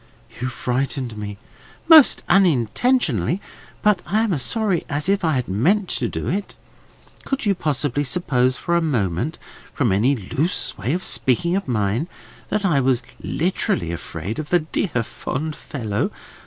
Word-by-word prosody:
"You 125 - 0
frightened 125 -1 -2
me." 105 -1 -6 0.5
"Most 320 -4 +7
unintentionally, 175 - +2 0.4
but 210 -3 +4
I 215 +4 +2
am 220 -5 +1
as 145 - -1
sorry 215 - 0
as 145 +1 -2
if 200 0 +2
I 160 -2 +2
had 125 -2 -1
meant 175 - +2
to - - 0
do - - -4
it. 200 +3 -2 0.7
Could 270 -4 -2
you 200 - +4
possibly 145 -5 -1
suppose 130 -4 +1
for 170 - -1
a 170 - +3
moment, 125 - -1 0.3
from 125 -7 +1
any 115 +9 +3
loose 135 - -1
way 115 +8 -2
of 185 +2 -2
speaking 170 +8 +1
of 195 - -2
mine, 115 - 0 0.4
that 210 -1 0
I 150 -7 +3
was 125 -2 +1 0.2
literally 155 - -1
afraid 85 - -5
of 155 - -5
the 175 - +5
dear 155 - -1
fond 150 +7 -4
fellow? 110 -9 -3
145 Hz, 155 wpm, -22 LUFS, 120-180 Hz, 0.7 s, Most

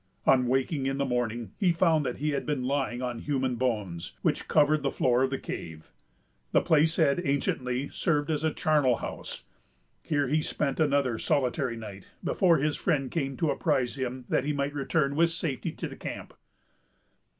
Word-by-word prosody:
On 130 -2 +4
waking 135 +2 0
in 135 0 -1
the 140 - 0
morning, 120 -4 -2
he 185 -3 +4
found 165 -4 +2
that 125 - -3
he 150 +2 -1
had 140 -1 -1
been 145 -4 -2
lying 130 -2 -1
on 120 -2 -3
human 130 -2 -1
bones, 105 -9 -2
which - - 0
covered 150 0 +4
the 140 - 0
floor 125 -1 +2
of 130 - +2
the 135 - -2
cave. 80 -9 -7 0.6
The - - +5
place 160 +1 +3
had 145 -1 +3
anciently 130 -2 -1
served 150 -3 0
as 155 0 -1
a 160 - +2
charnel 145 -5 +2
house. - - -6 0.6
Here 145 -3 0
he 155 +4 +2
spent 145 -2 -2
another 140 -6 +2
solitary 130 -4 0
night, 100 -4 -9 0.2
before 175 -4 +3
his 150 +1 0
friend 140 -8 0
came 135 -5 -2
to 160 -3 +1
apprise 135 -8 0
him 130 -1 -4
that - - +1
he 150 - -1
might 140 0 -1
return 140 0 0
with 165 +2 +4
safety 165 -6 -3
to - - -5
the - - -9
camp. - - -7
140 Hz, 185 wpm, -28 LUFS, 125-150 Hz, 0.6 s, The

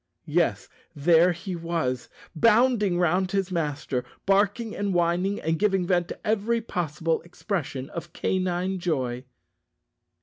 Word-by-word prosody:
Yes, 165 +2 +1 0.3
there 165 +4 +5
he 180 +2 -5
was, 165 -7 -2 0.3
bounding 225 -1 +4
round 180 +2 +2
his 195 -1 0
master, 145 -6 -2 0.2
barking 205 +3 +2
and 200 -2 -1
whining, 175 +4 +1
and 160 +1 -1
giving 195 -3 +2
vent 175 -1 +1
to - - -7
every 220 +2 +1
possible 165 -6 -2
expression 170 - -4
of 170 0 -7
canine 185 +1 -1
joy! 130 -7 -2
175 Hz, 125 wpm, -26 LUFS, 160-195 Hz, 0.3 s, there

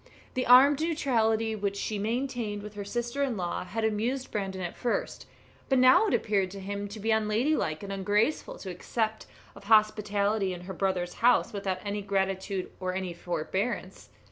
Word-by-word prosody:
The 255 - -1
armed 270 +4 +7
neutrality 225 -9 +1
which 200 -1 -2
she 210 0 -2
maintained 230 -2 -2
with 210 0 -8
her 205 -1 -5
sister 240 +6 -3
in 260 -6 0
law 175 -1 -2
had 215 +5 -3
amused 235 +5 -1
Brandon 190 -2 -3
at 175 - -5
first, 240 - -2 0.4
but 265 - +3
now 255 +12 +6
it - - 0
appeared 195 -3 +1
to 195 +2 -8
him 200 +1 -4
to 210 +2 -9
be 220 +2 0
unladylike 220 - +1
and 195 0 -5
ungraceful 205 +8 0
to 190 - -7
accept 220 +4 -3 0.3
of - - -13
hospitality 210 -2 +2
in 175 - -9
her 190 +2 -7
brother's 180 -2 -1
house 240 -1 +4
without 195 -1 -3
any 205 0 -2
gratitude 195 -1 -2
or 185 0 -2
any 185 -2 -3
forbearance. 185 +5 -3
210 Hz, 170 wpm, -28 LUFS, 190-230 Hz, 0.4 s, armed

